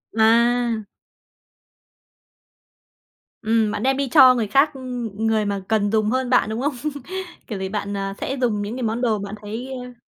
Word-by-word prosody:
À! 230 -1 +3 2.5
Ừm, 220 -1 +2
bạn 210 0 -3
đem 265 +1 +2
đi 275 -2 -1
cho 260 -3 +7
người 225 -3 -1
khác, 275 +8 +3
ư, 265 - -10
ừ, 245 -3 -4
người 220 -1 +2
mà 200 -1 -2
cần 210 -2 +1
dùng 215 -1 +2
hơn 255 0 0
bạn, 250 -4 +3
đúng 220 +2 -3
không? 285 +1 0 0.7
Kiểu 205 -4 -5
gì 190 0 -3
bạn, 200 -1 -3
à, 195 0 -3
sẽ 270 - -2
dùng 215 -4 +1
những 205 +3 -4
cái 255 - -4
món 225 +2 -1
đồ 220 -4 +1
bạn 200 +1 -6
thấy 225 +5 -6 0.2
ơ 245 -1 -13
225 Hz, 185 wpm, -22 LUFS, 210-250 Hz, 2.5 s, cho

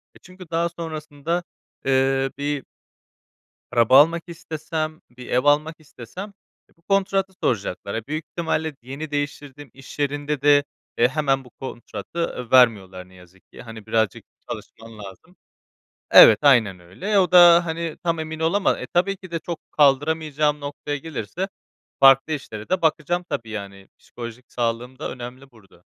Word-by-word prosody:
eee, - - -17
çünkü 185 -2 -14
daha 170 +1 +1
sonrasında, 160 0 -4 0.4
ııı, 135 0 +2
bir 145 -1 -2 1.1
araba 125 +2 +6
almak 165 +2 0
istesem, 155 -2 -5 0.2
bir 125 - -10
ev 125 +2 +1
almak 150 +2 +2
istesem 155 - -10 0.4
bu 165 - -31
kontratı 195 0 0
soracaklar. 100 -2 -2
Ya 115 - -2
büyük 155 +2 -4
ihtimalle 160 -2 -2
yeni 140 +5 -7
değiştirdim, 145 -1 -5
iş 135 +2 -13
yerinde 145 0 -2
de, 145 0 +5 0.3
eee, 120 - +5
hemen 135 -1 0
bu 125 - -15
kontratı 125 +1 -6
vermiyorlar 95 -8 +3
ne - - -20
yazık 90 +1 -19
ki. - - -11
Hani 115 -3 -11
birazcık 110 -2 0 0.3
çalışman 115 -1 -9
lazım. 105 - -12 0.8
Evet, 110 - +9
aynen 115 -10 +4
öyle. 185 - -1
O 185 -1 +2
da, 175 -1 +8
hani, 165 -1 -4
tam 170 -1 0
emin 160 0 -5
olama 165 +5 +1
E, - - -6
tabii 195 +3 +1
ki 185 -2 -13
de 165 - -2
çok 170 0 -6
kaldıramayacağım 150 +1 +2
noktaya 145 0 -5
gelirse 160 - -5 0.5
farklı 135 +3 +6
işlere 110 -7 -7
de 185 0 0
bakacağım 165 +2 0
tabii 115 -1 -4
yani. 100 -2 -8
Psikolojik 120 +1 -10
sağlığım 120 +2 -3
da - - -4
önemli 130 +2 -9
burada. 110 -5 -22
145 Hz, 150 wpm, -22 LUFS, 120-165 Hz, 1.1 s, Evet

